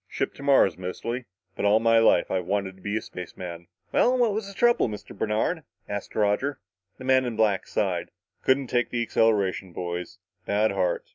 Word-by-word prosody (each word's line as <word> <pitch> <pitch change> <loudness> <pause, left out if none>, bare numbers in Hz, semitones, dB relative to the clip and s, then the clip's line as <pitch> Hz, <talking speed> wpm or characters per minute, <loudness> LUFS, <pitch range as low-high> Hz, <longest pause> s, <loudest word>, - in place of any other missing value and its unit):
Ship - - -2
to - - -13
Mars, 135 - +4
mostly. 115 +7 -4 0.3
But - - -4
all 105 +2 +5
my 115 0 +4
life 110 -6 +4
I've 90 -2 -1
wanted 95 -1 -1
to 95 - -20
be 105 +3 -2
a - - -4
spaceman." 85 -1 -8 0.2
"Well, 255 +1 +3
what 235 -4 +3
was 215 -1 -3
the 200 - -10
trouble, 240 - +3
Mr. 105 - -8
Bernard?" 110 +10 0 0.3
asked 100 -1 -5
Roger. 110 +7 +1 0.4
The - - -10
man 130 0 +4
in 120 -3 -3
black 105 -3 +1
sighed. - - -1 0.3
"Couldn't 135 +1 +3
take 120 0 0
the 120 -1 -1
acceleration, 100 -5 +1
boys. 90 0 -5 0.3
Bad 105 +2 +2
heart. 95 -3 0
110 Hz, 190 wpm, -26 LUFS, 95-130 Hz, 0.4 s, all